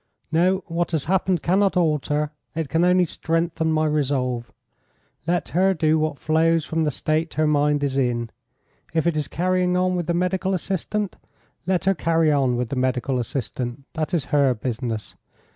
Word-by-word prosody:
"No, 180 Hz, +3 st, +2 dB
what 170 Hz, 0 st, -2 dB
has 155 Hz, -4 st, 0 dB
happened 185 Hz, -1 st, +1 dB
cannot 190 Hz, +2 st, +2 dB
alter 150 Hz, -2 st, +1 dB, 0.2 s
it 160 Hz, -3 st, -2 dB
can 165 Hz, +1 st, +2 dB
only 180 Hz, 0 st, +4 dB
strengthen 165 Hz, 0 st, -1 dB
my 155 Hz, 0 st, +2 dB
resolve. 130 Hz, -5 st, -1 dB, 0.8 s
Let 175 Hz, -3 st, 0 dB
her 190 Hz, +3 st, +2 dB
do 160 Hz, -1 st, +2 dB
what 155 Hz, -2 st, -1 dB
flows 160 Hz, +1 st, +2 dB
from 160 Hz, 0 st, 0 dB
the -, -, +2 dB
state 155 Hz, +3 st, -1 dB
her 155 Hz, -, +2 dB
mind 145 Hz, -1 st, +2 dB
is 135 Hz, -1 st, -1 dB
in. 120 Hz, -3 st, -1 dB, 0.6 s
If 160 Hz, -, +2 dB
it 170 Hz, -2 st, +2 dB
is 150 Hz, -2 st, -1 dB
carrying 180 Hz, +1 st, +1 dB
on 185 Hz, 0 st, +1 dB
with 175 Hz, -2 st, -2 dB
the 170 Hz, -, +1 dB
medical 185 Hz, +2 st, 0 dB
assistant, 195 Hz, +3 st, -2 dB, 0.5 s
let 185 Hz, -1 st, +1 dB
her 195 Hz, -, +4 dB
carry 165 Hz, -2 st, +2 dB
on 135 Hz, -4 st, +2 dB
with 120 Hz, -1 st, -2 dB
the -, -, -3 dB
medical 130 Hz, 0 st, 0 dB
assistant; 125 Hz, +1 st, -4 dB
that 155 Hz, -1 st, -2 dB
is 165 Hz, -6 st, 0 dB
her 140 Hz, -3 st, +4 dB
business. 115 Hz, -2 st, -4 dB
155 Hz, 175 wpm, -23 LUFS, 140-175 Hz, 0.8 s, only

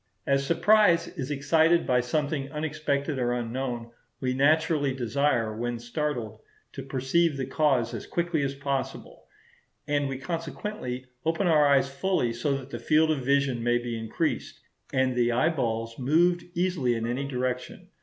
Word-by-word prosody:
As 140 Hz, 0 st, +2 dB
surprise 205 Hz, 0 st, +4 dB
is 135 Hz, -6 st, -6 dB
excited 160 Hz, +4 st, +3 dB
by 125 Hz, -1 st, +3 dB
something 140 Hz, +2 st, -2 dB
unexpected 150 Hz, -2 st, -2 dB
or 120 Hz, -1 st, +1 dB
unknown, 120 Hz, 0 st, -3 dB, 0.3 s
we 130 Hz, -1 st, -1 dB
naturally 145 Hz, 0 st, +2 dB
desire, 120 Hz, -2 st, 0 dB
when 120 Hz, +1 st, -2 dB
startled, 120 Hz, -2 st, -3 dB, 0.3 s
to -, -, -6 dB
perceive 140 Hz, +4 st, +1 dB
the 135 Hz, -, -2 dB
cause 135 Hz, -4 st, +1 dB
as -, -, -6 dB
quickly 170 Hz, -2 st, -1 dB
as 140 Hz, 0 st, -2 dB
possible; 140 Hz, -1 st, -4 dB, 0.6 s
and 145 Hz, -1 st, 0 dB
we 135 Hz, -, -3 dB
consequently 145 Hz, -3 st, -5 dB, 0.2 s
open 165 Hz, +5 st, 0 dB
our 155 Hz, -4 st, +5 dB
eyes 140 Hz, -1 st, +4 dB
fully, 140 Hz, -3 st, 0 dB
so 135 Hz, +4 st, -1 dB
that 135 Hz, 0 st, -10 dB
the -, -, -5 dB
field 155 Hz, +1 st, +3 dB
of 140 Hz, -4 st, -1 dB
vision 140 Hz, -2 st, +1 dB
may 120 Hz, +1 st, +2 dB
be 120 Hz, -1 st, -4 dB
increased, 110 Hz, -1 st, -3 dB, 0.3 s
and 130 Hz, -1 st, +1 dB
the 120 Hz, -1 st, +2 dB
eyeballs 115 Hz, -5 st, 0 dB
moved 170 Hz, +7 st, +2 dB
easily 170 Hz, -9 st, +1 dB
in 115 Hz, 0 st, -2 dB
any 125 Hz, +4 st, -2 dB
direction. 125 Hz, -1 st, -4 dB
135 Hz, 155 wpm, -27 LUFS, 125-155 Hz, 0.6 s, our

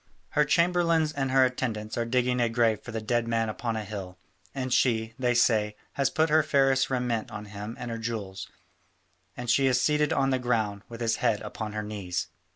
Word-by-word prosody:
Her 150 Hz, -, +2 dB
chamberlains 170 Hz, -1 st, +2 dB
and 135 Hz, -2 st, -1 dB
her 130 Hz, 0 st, +5 dB
attendants 115 Hz, -4 st, -3 dB
are 120 Hz, -, -1 dB
digging 125 Hz, +1 st, +1 dB
a 120 Hz, -, +2 dB
grave 115 Hz, -2 st, +2 dB
for 125 Hz, -, -8 dB
the 110 Hz, -1 st, -3 dB
dead 120 Hz, +1 st, 0 dB
man 115 Hz, -1 st, 0 dB
upon 115 Hz, +1 st, -3 dB
a 110 Hz, -, -3 dB
hill, 95 Hz, -3 st, -7 dB, 0.4 s
and 130 Hz, -2 st, -2 dB
she, 115 Hz, -3 st, +2 dB
they 125 Hz, -1 st, +1 dB
say, 110 Hz, -3 st, +3 dB, 0.2 s
has 140 Hz, -1 st, +1 dB
put 160 Hz, +2 st, +1 dB
her 155 Hz, +1 st, +6 dB
fairest 135 Hz, -3 st, +2 dB
raiment 125 Hz, -4 st, -1 dB
on 105 Hz, -, -7 dB
him 105 Hz, +3 st, -7 dB
and 125 Hz, -1 st, -5 dB
her 115 Hz, -, -4 dB
jewels, 100 Hz, -5 st, -5 dB, 0.9 s
and 125 Hz, -, -5 dB
she 135 Hz, +3 st, +3 dB
is 125 Hz, -1 st, +3 dB
seated 150 Hz, +2 st, +2 dB
on 135 Hz, -3 st, +2 dB
the 130 Hz, -, +1 dB
ground 110 Hz, -5 st, 0 dB
with 115 Hz, 0 st, -9 dB
his 115 Hz, -1 st, +1 dB
head 115 Hz, -4 st, +1 dB
upon 105 Hz, 0 st, -5 dB
her 105 Hz, 0 st, -3 dB
knees." 100 Hz, -4 st, -4 dB
120 Hz, 205 wpm, -27 LUFS, 110-135 Hz, 0.9 s, her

